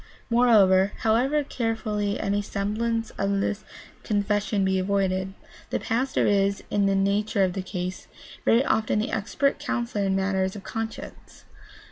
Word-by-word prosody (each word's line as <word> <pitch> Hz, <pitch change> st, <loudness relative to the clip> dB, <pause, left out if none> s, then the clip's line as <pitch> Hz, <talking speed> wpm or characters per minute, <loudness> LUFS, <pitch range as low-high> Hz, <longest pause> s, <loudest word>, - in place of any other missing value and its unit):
Moreover, 205 Hz, -5 st, +5 dB
however 255 Hz, +7 st, +2 dB
carefully 220 Hz, -5 st, -2 dB
any 200 Hz, +1 st, 0 dB
semblance 220 Hz, +3 st, -2 dB
of 200 Hz, 0 st, +1 dB
the 200 Hz, -, 0 dB, 0.5 s
confessional 205 Hz, -1 st, 0 dB
be 190 Hz, 0 st, +1 dB
avoided, 190 Hz, 0 st, 0 dB, 0.3 s
the -, -, -1 dB
pastor 255 Hz, +4 st, 0 dB
is, 200 Hz, -1 st, +2 dB
in 200 Hz, -1 st, +2 dB
the 195 Hz, -, +2 dB
nature 200 Hz, +1 st, +1 dB
of 185 Hz, -1 st, +1 dB
the 190 Hz, -, -3 dB
case, 185 Hz, -1 st, -5 dB, 0.4 s
very 240 Hz, +4 st, +4 dB
often 220 Hz, -1 st, +1 dB
the 210 Hz, -, -1 dB
expert 225 Hz, +7 st, 0 dB
counselor 240 Hz, -7 st, -2 dB
in 190 Hz, 0 st, +1 dB
matters 190 Hz, 0 st, 0 dB
of 200 Hz, -, -8 dB
conscience. 225 Hz, 0 st, -7 dB
205 Hz, 140 wpm, -25 LUFS, 195-225 Hz, 0.5 s, Moreover